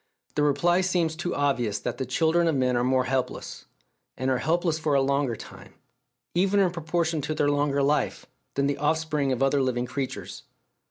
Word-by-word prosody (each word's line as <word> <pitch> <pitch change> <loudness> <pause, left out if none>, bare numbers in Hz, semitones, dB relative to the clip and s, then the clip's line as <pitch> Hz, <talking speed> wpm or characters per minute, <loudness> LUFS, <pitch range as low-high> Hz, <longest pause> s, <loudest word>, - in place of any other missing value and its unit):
The 150 - 0
reply 160 +5 +3
seems 175 -3 0
too 175 +2 -3
obvious 125 -7 0
that - - -4
the 130 - -2
children 160 +6 +2
of 160 - +2
men 130 -1 +1
are 120 - +1
more 130 0 +2
helpless, 130 0 -3 0.5
and 130 +1 0
are 130 - +1
helpless 165 +2 0
for 155 -2 +1
a - - +5
longer 140 -2 +1
time, - - -12 0.6
even 195 +3 +2
in 190 -3 +3
proportion 165 -1 -1
to 155 +3 -3
their 145 -1 +2
longer 145 -1 +1
life, 145 +2 0 0.3
than 140 - +1
the 140 0 -1
off 150 +2 +2
spring 150 -4 -1
of 130 +1 0
other 135 +1 +3
living 125 -2 0
creatures. 130 +1 -5
145 Hz, 195 wpm, -26 LUFS, 130-160 Hz, 0.6 s, a